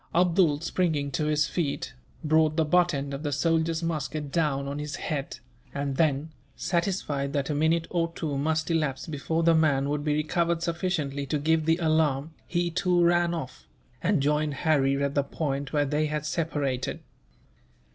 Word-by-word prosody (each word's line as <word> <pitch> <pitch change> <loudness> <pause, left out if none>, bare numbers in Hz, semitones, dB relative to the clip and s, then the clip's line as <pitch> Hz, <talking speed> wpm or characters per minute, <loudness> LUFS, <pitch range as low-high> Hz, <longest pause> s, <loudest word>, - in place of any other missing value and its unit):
Abdool, 170 -4 +3
springing 160 -5 0
to 150 +3 -1
his 150 0 +2
feet, 155 -3 -2 0.3
brought 155 0 +3
the 160 - +3
butt 175 +2 +3
end 140 -2 -3
of 140 - -4
the 145 -2 -2
soldier's 165 +2 +1
musket 150 -3 -3
down 140 -4 0
on 140 +1 -4
his 150 +2 -4
head; 145 -5 -4 0.4
and 140 -1 -2
then, 155 0 +1 0.2
satisfied 170 -6 -1
that 140 +1 -1
a - - 0
minute 160 +3 +2
or 170 -1 0
two 150 -4 -3
must 155 +3 0
elapse 140 -5 0
before 160 +2 -2
the 165 0 +5
man 145 -4 +2
would 145 0 -1
be 150 -1 +1
recovered 170 +2 0
sufficiently 165 -5 -2
to 150 - 0
give 160 +2 +1
the 165 0 +4
alarm, 155 -3 +1
he 175 -1 0
too 180 0 +2
ran 175 0 +3
off, 140 -6 -7 0.3
and 175 -5 +2
joined 150 0 +1
Harry 140 -2 +2
at 140 0 0
the 145 - +3
point 140 -1 -3
where 145 -1 +2
they 150 +2 0
had 150 0 -3
separated. 145 -5 -2
155 Hz, 175 wpm, -27 LUFS, 140-165 Hz, 0.4 s, the